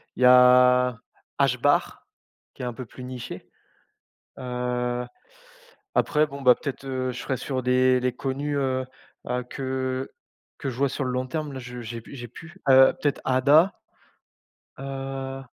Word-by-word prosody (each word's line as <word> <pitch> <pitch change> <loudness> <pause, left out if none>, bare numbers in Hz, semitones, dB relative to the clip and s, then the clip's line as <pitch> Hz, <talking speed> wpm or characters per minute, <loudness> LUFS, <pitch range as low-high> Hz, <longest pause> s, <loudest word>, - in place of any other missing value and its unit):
il 125 - -1
y - - +7
a 125 0 +6 0.4
HBAR 140 +1 +1 0.5
qui - - -10
est - - -2
un 120 - -3
peu 125 +2 -7
plus 125 +3 -12
niché. 125 -2 -8 0.9
Heu, 125 -1 -2 0.9
après, 155 -1 +2
bon, 140 -1 -9
bah, 125 -1 +7
peut-être, 140 -2 -6
heu, 130 -1 -2
je - - -8
serai 130 - -2
sur 130 -2 -3
des 125 0 +3
les 125 0 0
connus, 140 +3 -3
heu 130 -1 -1 0.4
heu, 125 0 -1
que 130 0 -3 0.5
que 135 - -3
je 120 - -8
vois 140 +1 +2
sur 135 - -3
le 125 - -2
long 130 0 -1
terme. 150 +1 -4
Là, - - -5
je 125 0 -8
j'ai 115 +1 -6
p - - -14
j'ai 120 -3 -8
plus. 170 - -13
Heu, 130 0 +7
peut-être 145 -2 0
ADA? 145 +8 +4 1.1
Heu 135 0 -5
130 Hz, 160 wpm, -25 LUFS, 125-135 Hz, 1.1 s, y